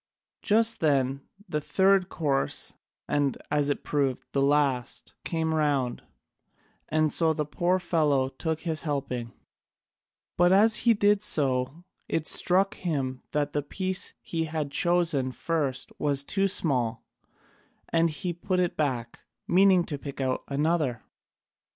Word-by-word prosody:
Just 225 +1 +2
then 140 -3 +1 0.3
the 150 -4 -2
third 190 +3 +2
course, 140 -4 -1 0.3
and, 145 -2 0
as 145 -1 +2
it 145 - -2
proved, 140 -3 -1
the 140 - 0
last, 140 -3 0
came 160 -1 -1
round, 145 -5 0 0.9
and 155 -1 +1
so 160 -2 +4
the 150 -1 -2
poor 175 +5 0
fellow 155 -7 +1
took 160 +4 -4
his 160 -3 -2
helping, 135 -6 -3 1.1
but 175 +1 +4
as 215 +3 +5
he 230 - +6
did 205 0 +3
so 135 0 +1 0.3
it 160 -1 -1
struck 195 +5 +3
him 135 -7 -3
that 145 -1 -1
the 145 - 0
piece 185 +6 -3
he 165 -1 -2
had 155 -2 -4
chosen 165 -5 +2
first 135 0 -2
was 140 -2 +1
too 195 +6 +1
small, 125 -11 0 0.8
and 165 0 +2
he 175 +3 -3
put 185 +2 -2
it 180 -1 0
back, 125 -6 -2 0.3
meaning 185 0 +5
to 145 -4 -5
pick 140 -1 -8
out 130 -1 -1
another. 145 -4 0
150 Hz, 135 wpm, -27 LUFS, 135-175 Hz, 1.1 s, he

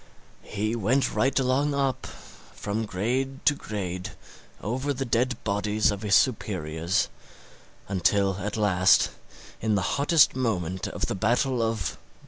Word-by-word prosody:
He 110 +3 -2
went 120 +5 +1
right 135 +1 +1
along 135 +2 +1
up, 135 -2 -1
from 110 +2 -6
grade 130 +8 -2
to 150 - +6
grade, 95 -8 -5 0.5
over 130 +7 -2
the 135 +2 -2
dead 125 +2 +1
bodies 105 +1 +1
of 100 -1 -5
his 105 -2 +3
superiors, 90 - +1 0.8
until 95 0 +1
at 105 +3 -3
last, 95 -3 +4 0.5
in 110 -1 +1
the 100 - +1 0.2
hottest 150 -1 +5
moment 95 -8 -1
of - - -3
the - - -2
battle 120 +5 +1
of... 115 -5 -2
110 Hz, 130 wpm, -26 LUFS, 100-130 Hz, 0.8 s, to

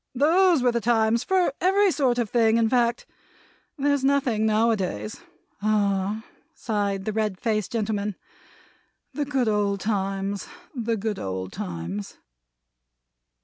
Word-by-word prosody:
Those 330 +2 +4
were 250 - +4
the 235 0 -1
times 225 0 +2
for 370 -6 +2
every 390 +2 +4
sort 260 -6 +1
of 240 -2 0
thing, 225 0 +3
in 230 -1 +3
fact. 240 -1 +1 0.7
There's 285 -1 +1
nothing 260 -6 +2
now 220 +2 +3
a - - +3
days. 110 - -4 0.4
Ah!" 205 0 0 0.3
sighed 200 -3 -2
the 215 - -2
red 210 -3 -1
faced 215 0 -1
gentleman. 210 -2 -1 1.0
"The 295 - -2
good 265 -4 0
old 205 -2 +1
times, 195 -1 -2 0.3
the 230 -3 -1
good 210 0 -3
old 95 -1 -4
times!" 90 +3 -5
220 Hz, 135 wpm, -25 LUFS, 200-245 Hz, 1.0 s, Those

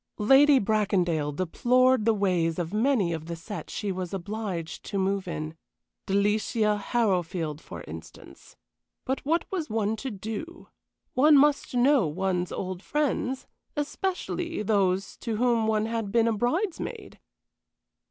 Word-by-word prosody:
Lady 270 +6 +6
Bracondale 190 -8 +1
deplored 245 - +2
the 225 - +4
ways 180 -5 +1
of 175 +1 -3
many 215 -6 +2
of 160 0 -5
the 170 - -4
set 185 +6 -7
she 205 -2 -3
was 185 0 -4
obliged 195 -3 -5
to 200 - -4
move 195 0 0
in 155 -2 -4 0.5
Delicia 210 +2 +2
Harrowfield, 180 - -1
for 85 - -9
instance. 80 +1 -11 0.5
But 265 +1 -2
what 325 +4 +1
was 350 -5 -2
one 215 0 0
to 270 - -4
do? 225 - -7 0.4
One 295 +3 +6
must 285 -2 +3
know 250 - +4
one's 180 +3 -1
old 185 -1 -4
friends, 265 -1 -1 0.3
especially 335 - -2
those 195 -2 +1
to 230 -2 -3
whom 235 -1 +2
one 215 -1 +1
had 225 -3 -3
been 230 0 +3
a 230 - +2
bridesmaid! 320 - -2
210 Hz, 135 wpm, -27 LUFS, 185-255 Hz, 0.5 s, Lady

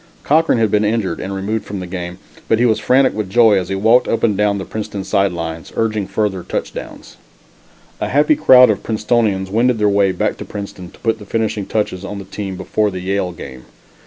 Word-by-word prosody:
Cochran 160 -2 +3
had 110 -3 +1
been 105 0 +2
injured 105 -5 -1
and 95 - -5
removed 105 +3 -2
from 100 -1 -6
the 90 - -5
game, 90 -1 -6 0.3
but 110 - +3
he 120 - +2
was 110 -3 +2
frantic 130 +2 +3
with 105 -3 -4
joy 110 -2 +5
as 90 - -5
he 95 - -1
walked 110 +5 +3
up 115 - -1
and 110 -3 +3
down 105 0 +1
the 95 - -5
Princeton 105 -2 -5
side 100 0 +1
lines, 80 -2 -6
urging 110 -3 -1
further 105 -4 -1
touchdowns. - - -6 0.8
A - - -2
happy 150 +2 +3
crowd 130 -5 +7
of 105 - -3
Princetonians 105 -3 0
wended 120 +3 +2
their 105 -1 +2
way 100 -1 +3
back 90 - -1
to - - -6
Princeton 100 -3 -8
to - - -19
put 115 -1 0
the 105 - -11
finishing 110 -3 -2
touches 100 -4 -2
on 100 +1 -6
the 100 - -8
team 100 -3 -6
before 105 +2 0
the 95 -2 -6
Yale 95 -1 -1
game. 65 -6 -10
105 Hz, 220 wpm, -18 LUFS, 95-115 Hz, 0.8 s, crowd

